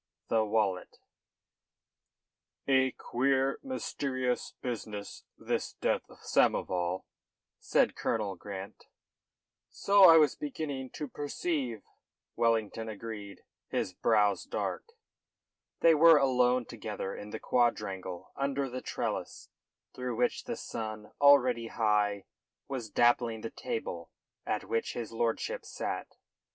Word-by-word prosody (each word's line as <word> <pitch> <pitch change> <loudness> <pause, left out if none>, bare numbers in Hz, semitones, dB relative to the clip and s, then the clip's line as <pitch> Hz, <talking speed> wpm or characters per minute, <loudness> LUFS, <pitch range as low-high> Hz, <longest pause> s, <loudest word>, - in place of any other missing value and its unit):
THE 110 -1 +3
WALLET 105 -4 0 1.7
"A 130 -1 +4
queer, 135 +2 0
mysterious 130 - -2
business 110 -4 -6
this - - -2
death - - -1
of - - -17
Samoval," 90 0 +1 0.6
said - - +2
Colonel 105 -4 -1
Grant. 95 +1 -8 0.8
"So 200 -1 +5
I 165 - +9
was 150 -4 +5
beginning 145 -3 -4
to 150 - -4
perceive," 145 - -3 0.5
Wellington 115 -1 0
agreed, 105 -2 -7 0.2
his 90 - -2
brow 105 0 +3
dark. - - -2 1.0
They 165 - +7
were 165 +1 +8
alone 125 -2 +3
together 105 -4 -5
in 105 - -8
the 110 - -5
quadrangle 95 -7 -1
under 140 0 -1
the 130 +1 -4
trellis, - - -4 0.4
through 125 -2 -4
which 125 +2 0
the - - -3
sun, 110 -1 -6
already 130 -5 +5
high, 105 -3 +1 0.4
was 125 -5 -4
dappling 120 0 +2
the 115 - -5
table 85 -6 -5 0.4
at 105 - -1
which 115 - -2
his 115 -3 -5
lordship 120 - -1
sat. - - -5
115 Hz, 110 wpm, -31 LUFS, 105-135 Hz, 1.7 s, I